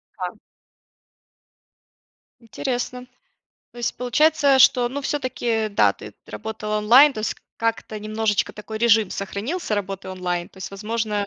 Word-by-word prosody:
Ка - - -5 2.0
Интересно. 250 +1 -4 0.7
То 240 - -13
есть, 235 - -2
получается, 280 +2 +3
что, 245 -1 +5
ну, 275 +3 -4
всё-таки, 245 -6 -1
да, 200 - +3
ты - - -11
работала 215 -1 -4
онлайн. 255 +7 +7
То 215 - -5
есть, 215 - -1 0.2
как-то 225 -1 -2
немножечко 215 0 -1
такой 215 +1 -7
режим 225 -4 +4
сохранился 215 - -3
работы 195 -1 -4
онлайн. 180 -2 -3
То - - -18
есть, 190 - -6
возможно 210 0 -2
220 Hz, 130 wpm, -23 LUFS, 210-250 Hz, 2.0 s, онлайн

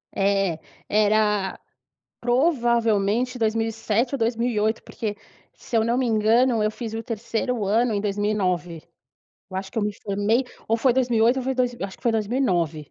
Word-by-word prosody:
É, 195 -4 +1 0.3
era, 210 -2 +2 0.6
provavelmente, 240 -3 +1
2007 225 +2 0
ou - - -1
2008, 225 -2 0
porque, 210 -2 -5 0.4
se 240 - -4
eu 220 - +3
não 235 +1 +1
me 260 - +1
engano, 225 +1 +3
eu 215 - +2
fiz 225 0 -6
o 225 - -3
3º 230 +1 -2
ano 225 +3 +2
em 200 - 0
2009. 195 -5 -1 0.7
Eu 185 - -5
acho 190 0 -4
que - - -4
eu - - 0
me 210 0 -1
formei 205 +5 +1 0.2
ou 225 - +3
foi 250 +2 +3
2008 240 -1 +2
ou - - -2
foi 265 +1 -1
dois 250 -1 0
eu 200 - -4
acho 190 - -11
que - - -29
foi 235 -3 +2
2009. 185 - 0
225 Hz, 165 wpm, -24 LUFS, 205-240 Hz, 0.7 s, eu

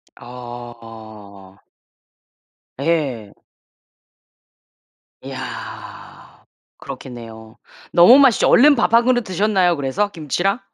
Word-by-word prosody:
아. 115 -5 -12 1.2
예. 135 -9 -2 1.9
이야. - - -10 0.3
그렇겠네요. 115 -3 -11 0.3
너무 175 +10 +7
맛있죠. 265 -6 +4
얼른 285 +4 +6
밥 230 -2 0
1 235 0 +4
그릇 245 -1 +1
드셨나요 190 -2 0
그래서 160 +9 -2
김치랑? 175 - -2
140 Hz, 160 characters per minute, -19 LUFS, -, 1.9 s, 너무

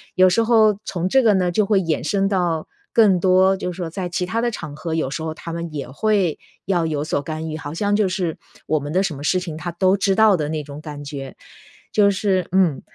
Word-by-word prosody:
有 185 0 +6
时 225 +5 +2
候 220 -3 +4
从 175 -1 -2
这 265 - +4
个 220 - +5
呢， 180 -2 +1
就 210 +4 +2
会 200 -1 +3
衍 165 -3 -1
生 195 +1 +1
到 175 -5 0 0.3
更 205 -6 +5
多 190 +1 +4
就 180 - -3
是 - - -13
说， 175 -3 -4
在 180 +1 -4
其 180 +1 -2
它 225 +6 -1
的 240 - 0
场 155 -9 -7
合， 160 +1 -4
有 155 -5 -1
时 160 +3 -4
候 160 - -3
他 165 +1 -8
们 170 -1 -5
也 140 -4 -5
会 190 +2 +1 0.3
要 175 -4 +1
有 150 -2 -1
所 145 - -1
干 155 +2 -5
预， 155 - -4
好 150 -1 -7
像 205 +4 0
就 205 -3 +2
是， 180 -4 -2 0.3
我 155 -1 +1
们 145 +1 -6
的 185 - +3
什 165 -6 -2
么 140 - -8
事 185 +4 +2
情 170 -4 -6
他 175 +2 -5
都 185 +3 +2
知 195 0 +2
道 220 -2 +5
的 150 -1 -2
那 155 -1 -2
种 145 +1 -9
感 150 -2 -8
觉。 140 -2 -7 0.6
就 205 -1 +5
是 190 -2 0
嗯， 180 -6 +2
180 Hz, 270 characters per minute, -21 LUFS, 155-195 Hz, 0.6 s, 有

